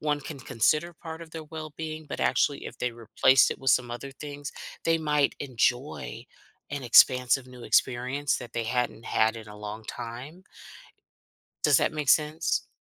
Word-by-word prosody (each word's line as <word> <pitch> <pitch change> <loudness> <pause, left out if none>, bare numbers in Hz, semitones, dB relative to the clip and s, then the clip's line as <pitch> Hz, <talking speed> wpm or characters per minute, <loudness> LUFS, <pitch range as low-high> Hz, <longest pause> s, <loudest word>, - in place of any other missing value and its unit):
one 150 -1 0
can 145 +1 -8
consider 145 +7 +1
part 160 +1 -8
of 160 - -12
their 160 -1 -7
well-being? 155 0 -7
But, - - -5
actually, 145 - +1
if - - -9
they 125 - -1
replace 120 +3 +4
it - - -4
with 135 -1 +1
some 120 +1 +2
other 120 +3 -6
things, 145 +1 -7 0.3
they 165 0 +3
might 150 -2 +1
enjoy 125 - -1 0.5
an 145 -1 -4
expansive 125 +1 +5
new 125 -1 -12
experience 130 +5 +1
that 125 -1 -9
they 115 - -2
hadn't 115 -1 -1
had 110 +1 +2
in 110 -2 -9
a 105 - -10
long 105 +1 -7
time. 125 +13 -7 1.2
Does - - +6
that - - +1
make 150 -2 -4
sense? 155 +3 +2
135 Hz, 170 wpm, -27 LUFS, 120-150 Hz, 1.2 s, Does